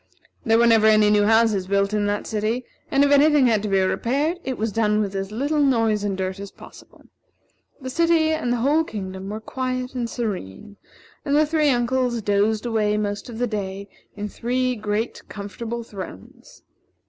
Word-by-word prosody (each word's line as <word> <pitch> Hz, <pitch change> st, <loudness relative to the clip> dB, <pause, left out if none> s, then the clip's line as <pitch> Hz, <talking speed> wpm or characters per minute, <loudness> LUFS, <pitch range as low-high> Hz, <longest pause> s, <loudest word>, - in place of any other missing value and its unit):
There 225 Hz, -4 st, +3 dB
were 235 Hz, -, +4 dB
never 225 Hz, -2 st, +5 dB
any 215 Hz, -1 st, +5 dB
new 205 Hz, -1 st, +4 dB
houses 220 Hz, -3 st, +3 dB
built 200 Hz, +1 st, +1 dB
in 205 Hz, -1 st, +1 dB
that 205 Hz, 0 st, -2 dB
city, 220 Hz, +3 st, -2 dB, 0.2 s
and 275 Hz, +1 st, +3 dB
if 285 Hz, -, +3 dB
any 285 Hz, +2 st, +6 dB
thing 295 Hz, -3 st, +4 dB
had 220 Hz, -4 st, +3 dB
to 210 Hz, -, -3 dB
be 195 Hz, 0 st, +3 dB
repaired, 280 Hz, -, 0 dB
it 260 Hz, -2 st, -3 dB
was 220 Hz, +1 st, -1 dB
done 210 Hz, 0 st, +1 dB
with 200 Hz, -2 st, -1 dB
as 195 Hz, 0 st, -4 dB
little 285 Hz, +7 st, -1 dB
noise 225 Hz, -6 st, +2 dB
and 200 Hz, -2 st, -2 dB
dirt 190 Hz, 0 st, -3 dB
as 200 Hz, 0 st, -7 dB
possible. -, -, -16 dB, 0.8 s
The 260 Hz, -2 st, -6 dB
city 330 Hz, 0 st, +2 dB
and 310 Hz, -6 st, -1 dB
the 245 Hz, -, +1 dB
whole 290 Hz, +7 st, +2 dB
kingdom 190 Hz, -6 st, -6 dB
were 215 Hz, +1 st, -4 dB
quiet 255 Hz, +2 st, -4 dB
and 240 Hz, -2 st, -3 dB
serene, 205 Hz, -, -5 dB, 0.5 s
and 285 Hz, -1 st, 0 dB
the 305 Hz, +1 st, +4 dB
three 305 Hz, -1 st, +2 dB
uncles 245 Hz, -1 st, +1 dB
dozed 210 Hz, +2 st, +1 dB
away 215 Hz, -3 st, +1 dB
most 205 Hz, +1 st, -3 dB
of 230 Hz, -, -8 dB
the 245 Hz, -, 0 dB
day 200 Hz, -3 st, -5 dB, 0.3 s
in 210 Hz, 0 st, -4 dB
three 250 Hz, +4 st, -1 dB
great 215 Hz, +1 st, -3 dB
comfortable 225 Hz, +3 st, -6 dB
thrones. 190 Hz, -, -11 dB
225 Hz, 190 wpm, -23 LUFS, 205-255 Hz, 0.8 s, any